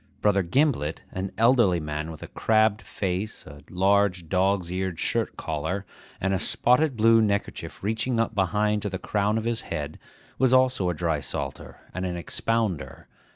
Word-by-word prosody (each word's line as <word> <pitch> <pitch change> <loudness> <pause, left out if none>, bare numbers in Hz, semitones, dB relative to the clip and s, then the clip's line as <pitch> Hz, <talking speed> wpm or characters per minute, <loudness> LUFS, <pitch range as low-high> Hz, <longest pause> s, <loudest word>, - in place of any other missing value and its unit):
Brother 100 -2 +3
Gimblet, 95 - +1
an 95 +1 -4
elderly 115 -6 +4
man 75 0 -4
with 80 -2 -9
a - - -7
crabbed 110 -1 +2
face, 95 +2 -4
a 75 +1 -12
large 95 -1 +2
dog's 95 -1 +1
eared 95 -2 -2
shirt - - -1
collar, 80 +6 -3 0.3
and 95 +1 0
a 95 - +1
spotted 125 - +2
blue 115 +1 +5
neckerchief 100 -3 -2
reaching 115 +3 0
up 115 0 0
behind 105 +2 +1
to 105 - -2
the 95 - -3
crown 105 +3 0
of 110 - -2
his 115 0 -1
head, 75 0 -5 0.4
was 130 -1 +4
also 130 -7 +3
a 90 - -1
drysalter 75 -4 -3
and 95 - -3
an 90 -1 -3
expounder. 90 - -2
100 Hz, 160 wpm, -26 LUFS, 85-110 Hz, 0.4 s, blue